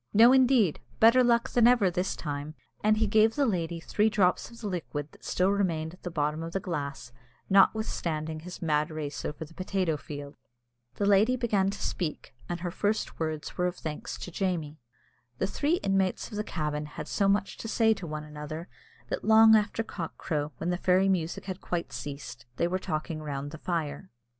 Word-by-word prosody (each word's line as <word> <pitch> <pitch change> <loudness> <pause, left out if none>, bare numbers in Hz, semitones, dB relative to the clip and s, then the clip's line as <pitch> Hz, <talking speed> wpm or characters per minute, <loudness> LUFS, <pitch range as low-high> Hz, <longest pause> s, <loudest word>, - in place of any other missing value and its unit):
"No, 235 +4 +8
indeed, 255 - +4 0.2
better 230 +3 +7
luck 235 -1 +3
than 240 -1 +5
ever 235 -7 +4
this 180 +2 -1
time!" 145 0 -5 0.3
and 215 0 +4
he 220 - +2
gave 220 +1 +4
the 285 - +2
lady 170 -6 -1
three 210 +6 +1
drops 195 -4 +2
of 235 - -14
the 215 - -4
liquid 155 -5 -4
that - - -20
still 185 +2 +1
remained 170 -5 0
at 185 - -16
the 180 - -4
bottom 150 -1 -1
of 165 +1 -6
the 195 - 0
glass, 140 -8 -4 0.4
notwithstanding 170 -6 +2
his 180 +2 -8
mad 150 -1 +1
race 150 -3 -5
over 150 +2 -4
the 160 - -17
potato 185 -3 -1
field. 145 0 -8 0.6
The 205 - 0
lady 205 +5 +4
began 210 -6 +1
to 200 - -5
speak, 165 -5 -3 0.2
and 175 -1 -3
her 175 -1 -3
first 210 +4 -1
words 155 0 -4
were 180 - +2
words 180 - -4
of - - -16
thanks 150 -2 -5
to 180 - -7
Jamie. 165 -5 -2 0.6
The - - 0
three 290 - +1
inmates 195 +2 0
of - - -6
the 210 - -1
cabin 150 -5 -3
had 150 - -7
so 200 - +1
much 195 0 +1
to - - -6
say 225 0 +3
to 185 -5 -7
one 155 0 -4
another, 150 +3 -7 0.4
that - - -3
long 220 0 +7
after 215 +1 +1
cock 170 -6 -6
crow, 150 -1 -2
when 170 +6 -1
the 175 - 0
fairy 185 +1 +3
music 170 -3 -1
had 185 -1 -5
quite 175 -1 -3
ceased, 130 -4 -7
they 170 - +1
were 185 +2 -1
talking 155 -2 -3
round 145 -1 -4
the 155 - -9
fire. 165 0 -3
180 Hz, 200 wpm, -28 LUFS, 155-205 Hz, 0.6 s, No